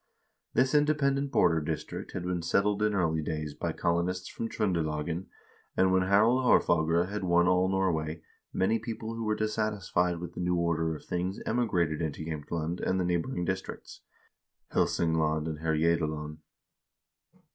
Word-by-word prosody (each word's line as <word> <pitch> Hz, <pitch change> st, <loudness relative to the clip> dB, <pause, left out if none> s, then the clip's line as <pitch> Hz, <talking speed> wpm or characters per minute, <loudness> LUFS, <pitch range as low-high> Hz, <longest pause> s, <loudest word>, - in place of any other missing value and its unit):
This 130 Hz, +2 st, +3 dB
independent 140 Hz, -2 st, +2 dB
border 80 Hz, -, +3 dB
district 80 Hz, +1 st, -5 dB
had 90 Hz, -, -4 dB
been 90 Hz, -1 st, -1 dB
settled 100 Hz, +4 st, +1 dB
in 105 Hz, -1 st, +2 dB
early 80 Hz, -4 st, +1 dB
days 75 Hz, -1 st, -3 dB
by -, -, -3 dB
colo 85 Hz, 0 st, +1 dB
nists 90 Hz, +1 st, -3 dB
from 115 Hz, -, -4 dB
Tr0ndelagen, 85 Hz, -4 st, -1 dB, 0.5 s
and 95 Hz, 0 st, +4 dB
when 95 Hz, 0 st, +4 dB
Harald 110 Hz, +6 st, +4 dB
Haarfagre 85 Hz, -6 st, +3 dB
had 105 Hz, -1 st, -4 dB
won 85 Hz, -1 st, +3 dB
all 90 Hz, 0 st, +3 dB
Norway, 80 Hz, -4 st, -1 dB, 0.3 s
many 110 Hz, +5 st, +1 dB
people 110 Hz, 0 st, -5 dB
who 115 Hz, 0 st, -4 dB
were 110 Hz, -1 st, +1 dB
dissatisfied 105 Hz, -5 st, 0 dB
with 85 Hz, 0 st, -7 dB
the -, -, -8 dB
new 90 Hz, 0 st, +1 dB
order 80 Hz, -2 st, 0 dB
of -, -, -11 dB
things 90 Hz, +2 st, -2 dB
emigrated 90 Hz, -10 st, 0 dB
into 80 Hz, -1 st, -3 dB
Jaemtland 80 Hz, +2 st, -3 dB
and 95 Hz, -, 0 dB
the 90 Hz, -, +1 dB
neighboring 90 Hz, +3 st, -1 dB
districts, 95 Hz, +1 st, -5 dB, 0.7 s
Helsingland 80 Hz, -2 st, +1 dB
and 80 Hz, -2 st, -4 dB
Herjedalen. 80 Hz, -1 st, 0 dB
90 Hz, 150 wpm, -29 LUFS, 80-105 Hz, 0.7 s, and